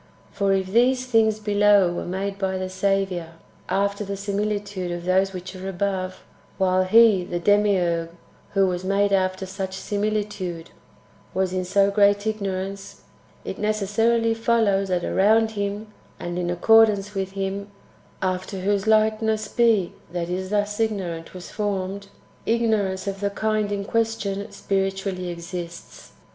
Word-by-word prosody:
For 200 -1 0
if 190 -1 +2
these 250 +2 +3
things 225 -3 +3
[below] 205 -3 +4
were - - -4
made 195 +2 -3
by 190 -1 -1
the 185 0 -3
Saviour 185 -3 -1 0.4
after 200 +1 0
the 200 0 -4
similitude 200 -2 -2
of 175 0 -5
those 190 +1 +2
which 185 0 -7
are 190 +1 -5
above, 185 0 -3 0.3
while 185 0 +2
He 215 -1 +6
(the 175 0 -4
Demiurge) 180 -3 +2 0.4
who 195 -1 +4
was 180 -1 -2
made 200 +1 +1
after 185 0 +1
such 190 0 -5
similitude 205 -5 -3 0.6
was 190 -1 0
in 185 0 -1
so 200 +2 +2
great 205 0 +3
ignorance, 195 -2 -4 0.4
it - - -5
necessarily 225 +2 +1
fol 230 0 +2
lows 195 -2 +2
that 180 -2 0
around 220 +3 +3
Him, 205 0 -4 0.3
and 175 0 -4
in 175 -1 -1
accordance 205 +2 +4
with 195 -1 -3
Him, 195 +1 -3 0.5
after 185 +1 -2
whose 200 +1 0
likeness 220 0 +2
he 225 -7 +3 0.2
that 175 -1 -2
is 185 +1 -3
thus 210 0 -1
ignorant 185 -7 -2
was 180 - -9
formed, 200 -1 -3 0.4
ignor 220 -3 +2
ance 190 +1 -5
of 195 -1 -4
the 200 0 0
kind 215 0 -1
in 200 -1 -2
question 215 -2 -1
spiritually 195 -2 -2
exists. 170 0 -8
195 Hz, 145 wpm, -24 LUFS, 185-210 Hz, 0.6 s, He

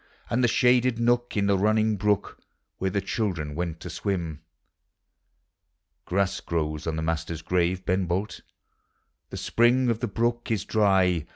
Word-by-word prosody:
And 125 +2 +2
the - - +5
shaded 125 0 +3
nook 120 0 +1
in 100 - +2
the 100 -1 +2
running 110 +1 +2
brook 105 0 0 0.4
Where 95 - 0
the 100 +2 -1
children 95 -7 -2
went 85 0 -3
to - - -7
swim? 85 -6 -3 1.6
Grass 100 +1 0
grows 75 -1 -3
on 80 - -1
the 80 - -3
master's 80 0 -3
grave, 90 +1 0
Ben 90 0 0
Bolt, 95 +5 -2 0.9
The - - -7
spring 120 +1 +3
of 115 - -2
the 120 - -1
brook 120 +3 -1
is 110 -4 -1
dry. 95 -6 +2
100 Hz, 155 wpm, -26 LUFS, 85-115 Hz, 1.6 s, the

